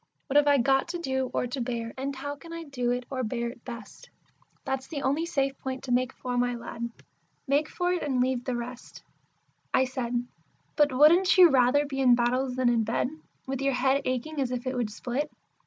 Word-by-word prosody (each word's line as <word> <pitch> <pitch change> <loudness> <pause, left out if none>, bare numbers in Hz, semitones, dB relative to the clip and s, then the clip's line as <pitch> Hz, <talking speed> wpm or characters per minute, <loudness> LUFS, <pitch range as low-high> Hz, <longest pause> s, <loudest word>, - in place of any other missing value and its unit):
'What 270 - -5
have 290 0 +6
I 285 -1 +6
got 270 +3 +3
to 345 +1 -3
do 265 -5 -1
or - - 0
to 250 +2 -4
bear; 235 -2 -3
and 275 +1 -3
how 285 +2 -5
can 330 +4 -13
I 335 0 -5
do 255 -5 -2
it 245 0 -1
or 260 -1 -2
bear 235 +1 -2
it 240 0 -12
best?' 235 - -10 0.6
That's 265 0 -2
the 290 -4 -5
only 295 +5 +1
safe 275 -5 0
point 260 0 -5
to 255 - -5
make 255 +1 +2
for, 250 -1 -3
my 245 0 +1
lad. 235 0 -5 0.6
Make 285 +3 +2
for 355 0 0
it, 360 - -1
and 270 -4 0
leave 250 -1 +1
the 255 -1 -2
rest!" 240 +1 -7 0.7
I 260 - +4
said, 245 -2 -2 0.5
"But 295 -2 +4
wouldn't 335 +9 +5
you 355 -3 +9
rather 265 +3 +4
be 275 -1 -4
in 250 -2 +6
battles 250 +2 0
than 255 -1 +1
in 235 -2 +3
bed, 225 +3 0 0.4
with 270 0 -3
your 275 0 +1
head 265 +2 +2
aching 265 +4 -2
as 260 - 0
if 250 0 -4
it 255 0 -2
would 240 -3 -1
split?" 255 +7 -3
260 Hz, 220 wpm, -28 LUFS, 245-280 Hz, 0.7 s, you